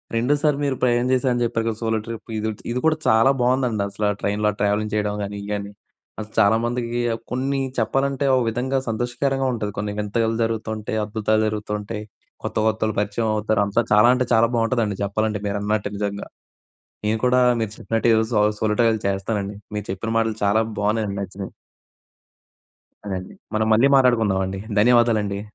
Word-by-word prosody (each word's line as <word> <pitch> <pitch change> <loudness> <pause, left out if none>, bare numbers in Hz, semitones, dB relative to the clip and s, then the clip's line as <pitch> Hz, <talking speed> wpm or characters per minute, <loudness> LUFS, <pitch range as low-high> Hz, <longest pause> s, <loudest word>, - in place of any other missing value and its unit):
రెండోసారి 145 +5 +2
మీరు 140 -2 0
ప్రయాణం 120 0 +2
చేశారని 125 -2 +1
చెప్పారు 115 -1 -1
కదా! 110 -2 -2
సోలో 110 -1 0
ట్రిప్ 115 0 -8
ఇది. 110 +1 -1 0.2
ఇది 125 - -1
కూడా 155 0 +3
చాలా 110 +4 +5
బావుందండి 125 -4 +1
అసలు 105 +1 -1
ట్రైన్‌లో 105 +1 +1
ఆ - - -11
ట్రావెలింగ్ 105 +1 0
చేయడం 105 -1 0
కాని 100 +1 -5
ఇయి 100 - -8
గాని 100 0 -4 0.5
అసలు 110 0 -8
చాలామందికి 115 +3 +1 0.3
కొన్ని 135 +2 -1 0.2
చెప్పాలంటే, 135 +4 0
ఒక 125 - +2
విధంగా 130 +4 -1
సంతోషకరంగా 130 +4 -1
ఉంటది 105 -3 -3
కొన్ని 105 0 -2
వింతగలు 115 +2 0
జరుగుతుంటాయి, 110 -1 -3
అద్భుతాలు 110 0 0
జరుగుతు 105 0 -3
ఉంటాయి. 105 +1 -6 0.4
కొత్త, - - -4
కొత్తోళ్ళు 110 -1 0
పరిచయం 105 +2 -1
అవుతారు. 105 0 +1
అంతా 100 +4 +1
చాలా 105 +3 +6
అంటే 125 0 +1
చాలా 115 +1 +5
బావుంటదండి 115 -3 0
చెప్పాలంటే 105 +1 -1
మీరన్నట్టు 100 0 -1
నిజంగా. 100 0 -3 0.8
నేను 110 +1 +1
కూడా 125 0 +4 0.2
మీరు 110 -2 -1
చెప్పినట్టు 115 +1 -1
ఏదో 110 0 +3
సోలో 105 0 +3
సోలో 105 -1 +1
ట్రైల్ 115 -1 +2
చేస్తానండి. 100 +1 -2 0.2
మీరు 105 -1 -4
చెప్పిన 100 +4 -4
మాటలు 110 -1 0
చాలా 105 +2 +3 0.2
బావున్నాయండి 105 -1 0
నచ్చినియి. 95 0 -6 1.5
అదేండి. 95 -2 -5 0.2
మనం 110 0 +1
మళ్ళీ 120 +5 +5
మాట్లాడుకుందామండి. 100 -7 +2 0.2
ధన్యవాదాలండి. 110 -3 +3
110 Hz, 155 wpm, -22 LUFS, 105-120 Hz, 1.5 s, చాలా